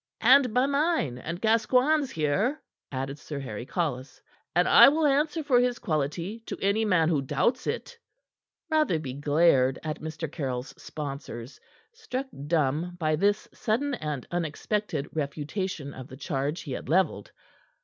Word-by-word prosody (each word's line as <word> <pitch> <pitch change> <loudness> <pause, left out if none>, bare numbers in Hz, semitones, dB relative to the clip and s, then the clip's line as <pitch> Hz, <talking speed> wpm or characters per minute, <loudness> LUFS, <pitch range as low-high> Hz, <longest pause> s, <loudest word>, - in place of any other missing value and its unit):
"And 255 +1 +6
by 250 +4 +3
mine 280 - 0
and 170 +6 -5
Gascoigne's 255 +6 +3
here," 190 - 0 0.3
added 135 +2 -4
Sir 150 - -7
Harry 125 -3 -6
Collis, 145 -7 -3 0.4
"and - - +4
I - - +9
will 310 +2 +1
answer 300 +3 +2
for 265 -4 +4
his 245 -1 +1
quality 170 +3 -2
to - - -4
any 200 +3 +1
man 180 -6 +3
who 155 -4 +2
doubts 150 - 0
it." 485 - -3 0.8
Rotherby 170 - +1
glared 145 -2 +3
at 155 -1 -4
Mr. 160 0 -4
Caryll's 130 -5 -3
sponsors, 140 -4 -7 0.3
struck 445 - -4 0.2
dumb 160 +2 0
by 155 -2 +1
this 205 +5 +1
sudden 270 +6 -1
and 150 - -4
unexpected 170 -1 -2
refutation 150 +1 -3
of 130 -1 -9
the 130 - -11
charge 140 +3 -2
he 145 - -8
had 130 - -5
leveled. 160 - +1
165 Hz, 145 wpm, -27 LUFS, -, 0.8 s, I